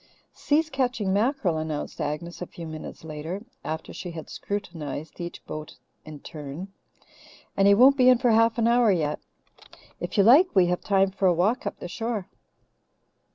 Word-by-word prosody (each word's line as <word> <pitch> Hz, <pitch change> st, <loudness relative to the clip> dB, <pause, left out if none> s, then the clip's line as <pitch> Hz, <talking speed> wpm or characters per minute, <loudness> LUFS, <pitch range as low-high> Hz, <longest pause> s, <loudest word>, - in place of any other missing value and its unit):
Si's 310 Hz, +2 st, 0 dB
catching 250 Hz, -7 st, 0 dB
mackerel," 205 Hz, -, +1 dB
announced 155 Hz, -2 st, -4 dB
Agnes 150 Hz, +5 st, -4 dB
a 180 Hz, -, -4 dB
few 170 Hz, -, -9 dB
minutes 155 Hz, 0 st, -8 dB
later, 160 Hz, +6 st, -6 dB, 0.2 s
after 160 Hz, +1 st, -5 dB
she 180 Hz, -, -6 dB
had 165 Hz, -2 st, -8 dB
scrutinized 165 Hz, -6 st, -5 dB
each 170 Hz, 0 st, -7 dB
boat 155 Hz, 0 st, -7 dB, 0.3 s
in 155 Hz, -2 st, -10 dB
turn, 150 Hz, +5 st, -8 dB, 0.9 s
"and 195 Hz, 0 st, +4 dB
he 200 Hz, -, +7 dB
won't 265 Hz, +5 st, +6 dB
be 255 Hz, -1 st, +6 dB
in 250 Hz, -, +6 dB
for 245 Hz, 0 st, +2 dB
an 230 Hz, +1 st, +3 dB
hour 235 Hz, -2 st, +4 dB
yet. 155 Hz, -5 st, 0 dB, 0.8 s
If -, -, -5 dB
you 200 Hz, -, +6 dB
like, 280 Hz, -, +6 dB
we 185 Hz, -2 st, +6 dB
have 180 Hz, 0 st, -1 dB
time 195 Hz, -1 st, +2 dB
for 195 Hz, 0 st, +1 dB
a 180 Hz, -, +5 dB
walk 205 Hz, +9 st, +1 dB
up -, -, -4 dB
the -, -, -6 dB
shore." 225 Hz, +1 st, -4 dB
190 Hz, 170 wpm, -26 LUFS, 160-230 Hz, 0.9 s, he